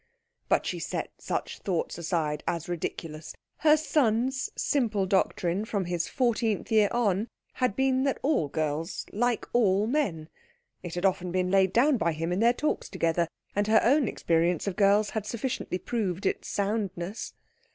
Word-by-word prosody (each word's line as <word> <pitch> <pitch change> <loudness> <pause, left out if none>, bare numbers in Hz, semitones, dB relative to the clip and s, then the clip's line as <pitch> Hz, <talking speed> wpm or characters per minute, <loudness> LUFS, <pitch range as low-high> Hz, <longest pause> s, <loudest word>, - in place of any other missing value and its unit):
But - - +3
she - - -3
set - - -4
such - - -3
thoughts 180 -4 -2
aside 155 -3 -1
as 170 -2 -2
ridiculous. 165 -2 -5 0.2
Her 305 0 +5
son's 260 -4 +1
simple 220 -8 +1
doctrine 190 0 +1
from 205 -4 -2
his 175 -1 -1
fourteenth 230 -4 0
year 215 -2 +5
on 215 -3 +1 0.3
had 250 -6 0
been 265 0 +2
that 275 - +1
all 275 - +2
girls 155 +4 -2
like 240 +2 0
all 205 -4 +3
men. 220 - -1 0.5
It 175 -2 -6
had 175 +2 -1
often 185 -2 +1
been 180 0 0
laid 190 -1 +4
down 260 +6 +4
by 170 -6 +1
him 165 +2 -3
in 180 - 0
their 230 +2 +5
talks 300 +5 -2
together, 165 0 0 0.3
and 205 +1 +1
her 220 0 +6
own 270 +1 +4
experience 170 -1 +1
of 200 -3 -2
girls 205 +1 +3
had 215 -2 -3
sufficiently 235 -4 -3
proved 195 -4 -3
its - - -1
soundness. 200 -2 -3
200 Hz, 160 wpm, -28 LUFS, 175-235 Hz, 0.5 s, her